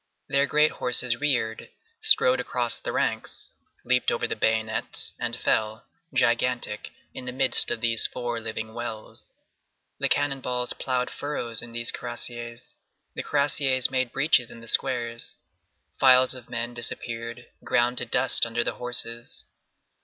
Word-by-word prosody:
Their 140 Hz, +1 st, +2 dB
great 150 Hz, +1 st, +3 dB
horses 125 Hz, -1 st, +1 dB
reared, 125 Hz, -6 st, -1 dB, 0.3 s
strode 125 Hz, +1 st, +4 dB
across 120 Hz, -2 st, -2 dB
the -, -, -5 dB
ranks, -, -, -2 dB, 0.3 s
leaped 125 Hz, 0 st, +1 dB
over 115 Hz, -, -1 dB
the -, -, -3 dB
bayonets 110 Hz, 0 st, -1 dB
and -, -, -3 dB
fell, 110 Hz, 0 st, -1 dB, 0.3 s
gigantic, 120 Hz, -4 st, 0 dB, 0.2 s
in 125 Hz, -, -8 dB
the 125 Hz, -, -4 dB
midst 130 Hz, +1 st, +6 dB
of 120 Hz, -2 st, -3 dB
these 115 Hz, -1 st, +3 dB
four 120 Hz, -2 st, -4 dB
living 110 Hz, 0 st, -6 dB
wells. 115 Hz, -2 st, -8 dB, 0.6 s
The -, -, 0 dB
cannon 145 Hz, -2 st, 0 dB
balls 125 Hz, -1 st, -1 dB
ploughed 125 Hz, -1 st, -2 dB
furrows 120 Hz, -6 st, -5 dB
in 120 Hz, 0 st, -11 dB
these 120 Hz, 0 st, 0 dB
cuirassiers; 120 Hz, -1 st, -6 dB, 0.4 s
the -, -, -4 dB
cuirassiers 140 Hz, -3 st, +1 dB
made 130 Hz, -2 st, -1 dB
breaches 135 Hz, -4 st, +2 dB
in -, -, -10 dB
the 115 Hz, -, -13 dB
squares. 120 Hz, -2 st, +1 dB, 0.6 s
Files 130 Hz, -1 st, +5 dB
of 125 Hz, -2 st, -11 dB
men 120 Hz, 0 st, -4 dB
disappeared, 115 Hz, 0 st, -5 dB, 0.2 s
ground 120 Hz, +1 st, +2 dB
to 125 Hz, -, -2 dB
dust 125 Hz, +3 st, +7 dB
under 115 Hz, 0 st, +1 dB
the -, -, -2 dB
horses. 120 Hz, -1 st, -1 dB
120 Hz, 145 wpm, -25 LUFS, 115-130 Hz, 0.6 s, dust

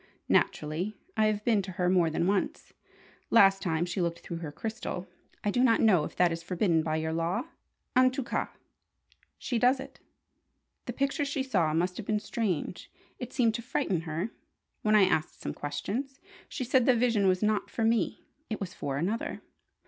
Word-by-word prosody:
Naturally, 170 Hz, +8 st, +1 dB, 0.2 s
I 220 Hz, 0 st, +3 dB
have 210 Hz, -1 st, -1 dB
been 220 Hz, -4 st, +3 dB
to 190 Hz, -1 st, -7 dB
her 180 Hz, 0 st, 0 dB
more 180 Hz, -2 st, +4 dB
than 160 Hz, +2 st, 0 dB
once. 195 Hz, +1 st, -1 dB, 0.6 s
Last 195 Hz, -3 st, +6 dB
time 165 Hz, -1 st, 0 dB
she 180 Hz, +1 st, -2 dB
looked 170 Hz, -1 st, -2 dB
through 170 Hz, -, -6 dB
her 165 Hz, -3 st, -6 dB
crystal. 215 Hz, 0 st, -5 dB, 0.4 s
I 210 Hz, -, +1 dB
do 245 Hz, +4 st, +2 dB
not 230 Hz, -3 st, +4 dB
know 190 Hz, -8 st, +5 dB
if -, -, -8 dB
that 180 Hz, -1 st, +3 dB
is 165 Hz, 0 st, -3 dB
forbidden 170 Hz, -1 st, +1 dB
by 155 Hz, -1 st, -1 dB
your 160 Hz, 0 st, -1 dB
law? 165 Hz, +3 st, 0 dB, 0.5 s
En 255 Hz, 0 st, +6 dB
tout 255 Hz, 0 st, -4 dB
cas, -, -, -2 dB, 0.9 s
she 240 Hz, -3 st, -2 dB
does 255 Hz, +2 st, +4 dB
it. 265 Hz, -, -9 dB, 0.9 s
The -, -, -3 dB
picture 275 Hz, +2 st, 0 dB
she 280 Hz, -1 st, -1 dB
saw 185 Hz, -12 st, +1 dB
must 180 Hz, +2 st, 0 dB
have 220 Hz, -, -6 dB
been 215 Hz, -1 st, +1 dB
strange. 200 Hz, -6 st, -3 dB, 0.3 s
It 245 Hz, -1 st, -6 dB
seemed 235 Hz, -4 st, +2 dB
to 235 Hz, -, -3 dB
frighten 235 Hz, -, -1 dB
her. 165 Hz, +6 st, -3 dB, 0.5 s
When 215 Hz, 0 st, +3 dB
I 210 Hz, -, +7 dB
asked 160 Hz, -4 st, 0 dB
some -, -, -4 dB
questions, 205 Hz, -, -4 dB, 0.3 s
she 265 Hz, -, -4 dB
said 255 Hz, 0 st, +3 dB
the 255 Hz, -, +6 dB
vision 230 Hz, -4 st, +2 dB
was 185 Hz, +1 st, +2 dB
not 215 Hz, -1 st, +1 dB
for 230 Hz, -, -2 dB
me. 225 Hz, 0 st, +1 dB, 0.2 s
It 220 Hz, -, -3 dB
was 185 Hz, -3 st, -5 dB
for 140 Hz, -1 st, -3 dB
another. 195 Hz, +10 st, -2 dB
200 Hz, 190 wpm, -29 LUFS, 170-230 Hz, 0.9 s, I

